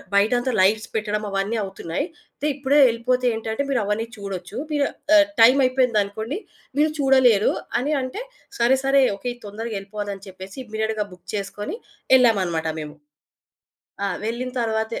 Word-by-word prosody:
బయటంతా 245 +5 +3
lights 215 +3 +3
పెట్టడం 210 -1 -1
అవన్నీ 195 +3 -1
అవుతున్నాయి. 190 - -4 0.3
అయితే 295 - -2
ఇప్పుడే 280 +1 +2
యెళ్ళిపోతే 250 +2 0
ఏంటంటే, 225 +4 -3
మీరవన్నీ 225 -2 0
చూడొచ్చు, 195 0 -6
మీరు 290 -1 +2 0.3
ఆహ్, 305 - +7 0.2
టైమయిపోయిందనుకోండి, 250 - +3 0.4
మీరు 305 +1 +4
చూడలేరు 260 -6 +5 0.3
అని 285 +5 -1
అంటే, 255 - -5 0.4
సరే 245 +3 +4
సరే, 275 0 +5 0.2
ఓకే, 245 +4 -4
తొందరగెళ్ళిపోవాలని 205 -2 -5
చెప్పేసి 190 +2 -10
ఇమ్మీడియేట్‌గా 220 -1 -2
బుక్ 180 - -18
చేసుకొని 205 - -4 0.4
యెళ్ళామనమాట 190 -10 +3
మేము. 150 0 -8 1.1
ఆ! - - +1 0.2
వెళ్ళిన 240 +3 -3
తరువాతే 220 -1 -1
220 Hz, 125 wpm, -23 LUFS, 200-255 Hz, 1.1 s, ఆహ్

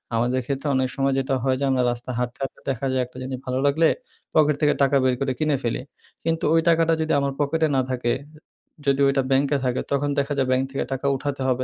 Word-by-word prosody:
আমাদের 120 +3 +1
ক্ষেত্রে 140 +2 -3
অনেক 130 -1 +1
সময় 135 0 +1
যেটা 135 0 0
হয় 130 -1 +1
যে 140 - 0
আমরা 130 -1 +2
রাস্তা 120 +1 -5
হাঁটতে, 125 -1 -3
হাঁটতে 135 - -6
দেখা 135 0 -2
যায় 130 0 +1
একটা 125 +1 -15
জিনিস 130 0 -4
ভালো 130 0 -1
লাগলে 155 +3 +4 0.5
পকেট 150 -1 +4
থেকে 150 -1 +4
টাকা 140 0 +3
বের 130 -1 +3
করে 135 -1 0
কিনে 150 -2 +1
ফেলি। 120 0 -1 0.4
কিন্তু 165 0 0
ওই 165 - +5
টাকাটা 165 -1 +4
যদি 160 0 0
আমার 140 0 0
পকেটে 160 +2 +1
না 130 - +3
থাকে, 120 -2 0 0.7
যদি 140 0 +3
ওইটা 135 -1 +2
ব্যাংকে 140 +2 +3
থাকে, 125 0 0
তখন 140 +1 +1
দেখা 140 +1 -1
যায় 135 -1 +1
ব্যাংক 130 +1 +2
থেকে 135 - -1
টাকা 135 +1 -4
উঠাতে 140 0 -3
হবে 130 0 +1
135 Hz, 225 wpm, -23 LUFS, 130-145 Hz, 0.7 s, ওই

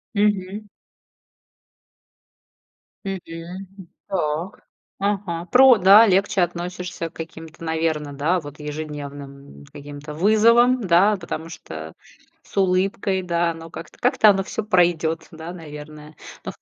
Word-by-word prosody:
Мгм. 205 0 0 2.4
Мгм, 195 -1 -3 0.6
м, 190 -3 -11 0.2
так, 170 0 -3 0.4
ага. 195 -4 -2
Про 255 -1 +8
да, 200 +4 +8
легче 195 0 +2
относишься 175 0 -3
к - - -31
каким-то, 160 0 -9
наверное, 160 -2 -1
да, 155 +6 +1
вот 145 0 -11
ежедневным 145 - -8
каким-то 145 +1 -9
вызовам, 230 +8 +4
да, 190 +5 +4
потому 170 -3 -6
что 80 - -9 0.5
с - - -17
улыбкой, 190 0 +1
да, 170 -1 0
но 165 0 -10
как-то 165 - -11
как-то 215 - +4
оно 195 -1 +3
всё 220 - -4
пройдёт, 170 -5 +1
да, 160 +2 -8
наверное, 150 -2 -10 0.3
но - - -3
170 Hz, 115 wpm, -22 LUFS, 155-195 Hz, 2.4 s, Про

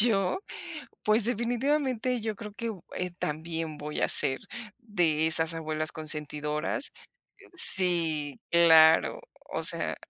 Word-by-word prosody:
Yo, 205 - 0 0.7
pues, 215 +1 +1
definitivamente, 250 +1 -2
yo 220 0 -5
creo 210 0 -10
que 230 +2 -6
u 190 -6 -12
eh, 180 0 -4
también 160 0 -6
voy 150 +1 -7
a - - 0
ser 130 0 +7 0.4
de 175 - -1
esas 160 0 +3
abuelas 155 -1 -5
consentidoras 150 - -4 0.6
Sí, 170 - +4
claro, 165 - +4 0.3
o - - -4
sea - - +2
170 Hz, 120 wpm, -26 LUFS, 155-225 Hz, 0.7 s, ser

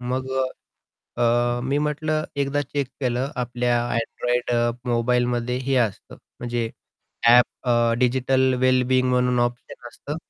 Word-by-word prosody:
मग 130 +2 -3
अ, 130 -1 -3 0.5
अ, 120 +1 +2
मी 140 +2 0
म्हटलं 155 +1 -1
एकदा 140 +1 0
चेक 140 -1 -3
केलं 130 +1 -1
आपल्या 120 -1 0 0.2
Android 120 +1 -2
अ, 120 0 +2 0.2
मोबाईलमध्ये 120 +1 0
हे 130 0 -1
असतं 100 - -12 0.2
म्हणजे 120 -1 -2 0.6
ॲप 120 +1 +8 0.2
अ, 120 -1 +3
डिजिटल 130 +1 +2
वेलबीइंग 130 0 +3
म्हणून 125 0 +2
ऑप्शन 120 0 -4
असतं 145 +5 -7
125 Hz, 130 wpm, -23 LUFS, 120-130 Hz, 0.6 s, ॲप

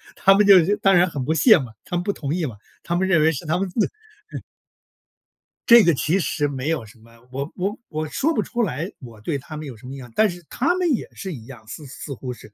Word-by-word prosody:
他 195 0 +5
们 205 0 +4
就 195 0 +6
当 195 -2 +3
然 175 +1 +4
很 135 -5 -4
不 160 - +1
屑 215 +6 +6
嘛， 125 -7 -6
他 175 - -5
们 175 - -1
不 200 - -1
同 145 -3 -4
意 175 -4 -1
嘛， 115 -6 -6 0.3
他 170 - -2
们 190 +2 +1
认 170 -5 +3
为 160 - +4
是 145 - -5
他 160 - +1
们 195 +1 -1
自 210 +4 +1 0.5
嗯。 - - -5 1.3
这 235 -3 +9
个 170 - +4
其 155 +5 +1
实 150 -5 0
没 140 +1 -4
有 155 -9 -1
什 115 +2 -17
么， 115 +1 -20 0.2
我 140 +4 -5
我 195 +5 -2
我 155 0 -3
说 295 - 0
不 - - +1
出 240 -2 -2
来， 165 - -3
我 115 -5 -12
对 140 +7 -2
他 150 +3 -9
们 155 0 -6
有 130 - -8
什 110 - -16
么 135 +2 -7
样， 125 -3 -10
但 215 -1 +4
是 175 0 -8
他 320 +8 +1
们 365 -2 0
也 235 - -2
是 190 -3 -6
一 115 -5 -10
样， 120 -5 -13
似 150 +6 -8
似 140 +1 -8
乎 130 0 -6
是， 120 - -11
就 105 - -25
160 Hz, 285 characters per minute, -22 LUFS, 135-195 Hz, 1.3 s, 这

